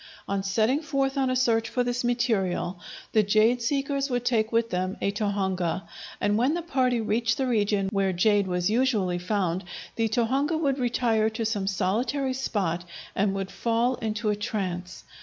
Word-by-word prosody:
On 200 0 -1
setting 220 +8 +1
forth 275 -3 -1
on 270 -2 +1
a 255 - +1
search 230 -3 +2
for 250 - 0
this 245 0 -1
material, 215 -7 0 0.3
the 220 - +4
jade 215 +4 +3
seekers 275 +2 0
would 245 -1 -1
take 225 -3 +1
with 230 0 +1
them 185 +1 -1
a 200 - 0
tohunga, 190 -4 -1 0.4
and 205 +1 +1
when 265 +7 +2
the 345 - -3
party 255 -6 +1
reached 230 +1 0
the 265 - 0
region 205 -5 +1
where 195 -2 +1
jade 200 +2 +2
was 180 -1 0
usually 215 -6 +1
found 185 -1 -1 0.3
the 225 -1 +1
tohunga 265 +8 +1
would 280 -4 0
retire 230 -3 +2
to 225 +1 -3
some 205 -3 -1
solitary 230 +8 0
spot 195 -10 -1 0.3
and 195 0 +1
would 195 -1 -3
fall 235 +2 +1
into 215 -1 -1
a - - 0
trance. 185 -4 -4
220 Hz, 175 wpm, -26 LUFS, 195-250 Hz, 0.4 s, the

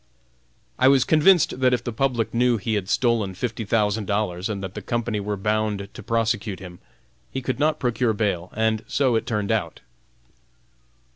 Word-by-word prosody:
I 130 - +5
was 135 -2 +5
convinced 160 -2 +4
that 130 -1 +4
if 120 - -6
the 120 - -4
public 120 -1 0
knew 120 0 +3
he 110 +2 -2
had 100 -3 -2
stolen 115 -6 +1
fifty 115 +2 -3
thousand 105 -1 0
dollars 100 -2 -1
and 100 -2 -4
that 95 -1 -5
the - - -6
company 120 -2 -2
were 105 0 -3
bound 105 -1 -1
to - - -9
prosecute 115 -4 -1
him, 90 -2 -10 0.5
he 135 - -3
could 130 +1 -3
not 155 +1 +2
procure 120 -2 0
bail, 95 -5 -2
and 110 0 +1
so 130 -3 +1
it 110 - -1
turned 105 -3 -1
out. - - -2
110 Hz, 180 wpm, -23 LUFS, 100-125 Hz, 0.5 s, I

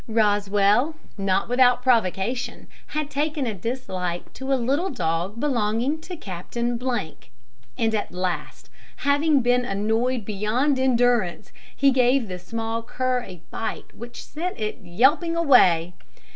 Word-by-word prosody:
Rosswell, 210 +5 +2 0.2
not 195 -1 0
without 245 0 +4
provocation, 235 0 0 0.2
had 305 -1 -2
taken 295 0 -1
a 225 - -1
dislike 185 -5 -4
to 265 +1 -5
a - - +5
little 275 +9 0
dog 175 - -2
belonging 245 +2 0
to 355 +1 -8
Captain; 235 - -3 1.0
and 225 -1 +1
at 210 - -1
last, 180 -1 -4 0.2
having 285 0 +2
been 245 +1 +3
annoyed 225 +3 0
beyond 225 +7 0
endurance, 240 -7 +2 0.2
he 275 0 +4
gave 250 -1 +3
the 180 -1 -6
small 225 +4 -3
cur 250 +2 -1
a 180 -7 -11
bite 225 - -5
which 240 +1 -9
sent 335 -1 -5
it 215 +3 -3
yelping 265 - +2
away. 180 - +5
235 Hz, 130 wpm, -24 LUFS, 200-265 Hz, 1.0 s, a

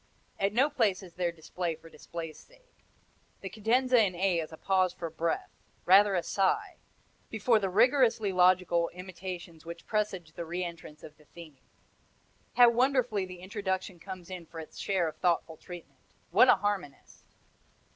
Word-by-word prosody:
At 195 0 +1
no 255 +7 +3
place 220 -10 0
is 175 -2 -12
there 175 -1 -1
display 170 +1 -4
for 165 +1 -16
display's 165 -1 -8
sake. - - -24 0.6
The 195 - -6
cadenza 240 +3 +3
in 185 -3 -1
A 180 -1 +1
is 160 -1 -5
a 160 - -10
pause 185 -1 +1
for 170 -3 -6
breath, 165 +1 -2 0.3
rather 195 +2 +6
a 175 - 0
sigh, 195 -1 0 0.5
before 225 +1 +2
the 195 -2 -1
rigorously 230 0 +3
logical 180 -2 +3
imitations 180 -2 -8
which 170 0 -9
presage 195 -6 -2
the 170 - -5
re 175 +3 -3
entrance 170 -3 -9
of 150 - -12
the 150 - -22
theme. 155 -4 -13 1.0
How 245 -1 +7
wonderfully 245 -5 +1
the 180 -1 -10
introduction 190 -2 -4
comes 185 0 -9
in 175 -3 -7
for 165 - -9
its 160 - -10
share 190 -4 0
of 155 -1 -7
thoughtful 170 -2 0
treatment. 175 -1 -12 0.3
What - - +6
a - - +8
harmonist! 195 -9 -5
185 Hz, 165 wpm, -29 LUFS, 170-205 Hz, 1.0 s, a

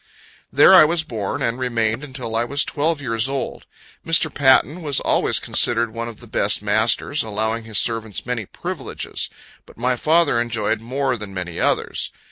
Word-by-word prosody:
There - - +6
I - - +10
was 160 +1 +1
born, 110 -9 -4
and 115 +2 -1
remained 115 0 -1
until 125 -5 -6
I 115 - +2
was 140 +4 +1
twelve 150 0 -1
years 115 0 0
old. 135 -2 -4 0.4
Mr. 165 -1 +1
Patten 140 +4 +3
was 145 -4 0
always - - +1
considered 115 -1 +1
one 115 0 -4
of 115 -2 -10
the - - -11
best - - +1
of - - -17
masters, 110 +7 +1
allowing 110 +1 -2
his 110 -2 -4
servants 110 -6 -1
many 120 -5 -3
privileges; - - -5 0.4
but - - -17
my 125 +2 0
father 155 -2 +2
enjoyed 110 -2 -1
more 130 +2 -1
than 105 -3 -9
many 90 -2 -5
others. - - 0
120 Hz, 175 wpm, -21 LUFS, 110-140 Hz, 0.4 s, I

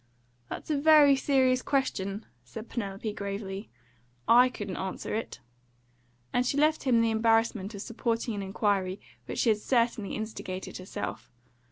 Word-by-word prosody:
"That's - - -5
a 290 - +1
very 295 -2 +7
serious 260 -2 +2
question," 210 -8 -1 0.2
said 215 - -9
Penelope 205 -1 -4
gravely. 200 -1 -5 0.6
"I 245 +2 +7
couldn't 205 -6 -6
answer 190 0 -4
it," 215 - -4 0.9
and 245 - +3
she 250 +3 -1
left 305 +1 +2
him 240 -3 +4
the 230 0 +2
embarrassment 225 -2 +1
of 200 - -6
supporting 230 0 -2
an 205 - -3
inquiry 195 -1 0 0.3
which - - -5
she 235 - +2
had 215 -1 +3
certainly 230 -3 0
instigated 215 -4 -5
herself. 185 - -6
225 Hz, 145 wpm, -28 LUFS, 200-250 Hz, 0.9 s, very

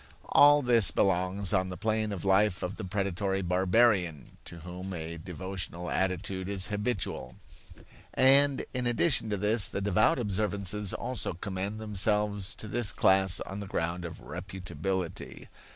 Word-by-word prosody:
All 145 0 +6
this 120 -5 +5
belongs 95 0 0
on 95 0 +1
the 90 - -6
plane 110 0 -1
of 100 -2 -5
life 95 -1 +2
of 90 +2 -3
the - - -7
predatory 95 0 -2
barbarian, 90 - +1
to 85 -1 -9
whom 90 +2 -7
a 80 0 -6
devotional 90 0 -5
attitude 95 0 -2
is 100 0 -1
habitual. 105 -1 -3 0.8
And 140 +1 +5
in 125 -2 -1
addition 120 -1 +2
to 105 - -1
this, 105 +2 +2
the - - -3
devout 100 +1 +2
observances 100 -2 -1
also 125 -6 -3
commend 100 +3 -4
themselves 105 -1 0
to 110 - -9
this 110 -1 -1
class 95 0 +3
on 95 +1 -6
the 100 - -6
ground 85 -1 -2
of 85 -1 -8
reputability. 95 0 -5
95 Hz, 145 wpm, -29 LUFS, 90-105 Hz, 0.8 s, All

